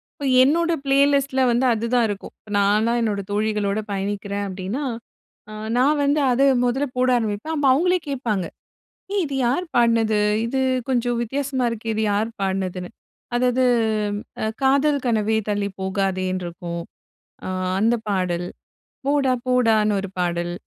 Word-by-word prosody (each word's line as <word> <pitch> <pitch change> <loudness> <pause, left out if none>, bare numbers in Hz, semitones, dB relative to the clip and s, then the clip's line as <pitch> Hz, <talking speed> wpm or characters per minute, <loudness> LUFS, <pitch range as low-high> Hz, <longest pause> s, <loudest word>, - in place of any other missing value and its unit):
இப்ப 285 - -6 0.2
என்னோட 335 +5 +2
பிளேலிஸ்ட்ல 275 -1 +3
வந்து 240 +2 +2
அதுதான் 235 +2 +1
இருக்கும். 200 -1 -6
இப்ப 210 - -15
நான்லாம் 215 +4 +2
என்னோட 210 -3 -1
தோழிகளோட 210 -1 0
பயணிக்கிறேன் 200 +1 -3
அப்டின்னா, 195 +9 -4 0.7
அ - - -8 0.2
நான் 290 +4 +3
வந்து 285 +2 +2
அத 245 +2 +1 0.2
மொல்ல 250 +3 +1
போட 255 0 +2
ஆரம்பிப்பேன். 220 +7 -3
அப்ப 290 -2 0
அவுங்களே 360 +6 +2
கேப்பாங்க. 230 -9 -1 0.7
ஏய், 405 -2 +1
இது 280 - -5
யாரு 275 +10 0
பாடுனது? 230 -3 +3 0.3
இது 265 +3 -1 0.3
கொஞ்சம் 245 -1 0
வித்தியாசமா 265 +2 -2
இருக்கே, 225 0 -3
இது 220 - -1
யாரு 215 +3 0
பாடுனதுன்னு. 190 -2 -2 0.5
அதாவது, 250 +1 +2 0.8
அ, - - +1 0.2
"காதல் 280 +1 +3
கனவே 220 -2 +1
தள்ளிப் 200 -1 -2
போகாதேனுட்டு" 185 -1 -1
இருக்கும், 170 -1 -6 0.7
அ, - - -4 0.3
அந்தப் 225 +2 +1
பாடல். 180 -3 -1 0.6
"போடா 280 -2 +2
போடான்னு" 220 -5 +3
ஒரு 195 0 -5
பாடல். 175 -1 -1
225 Hz, 135 wpm, -22 LUFS, 200-265 Hz, 0.8 s, பிளேலிஸ்ட்ல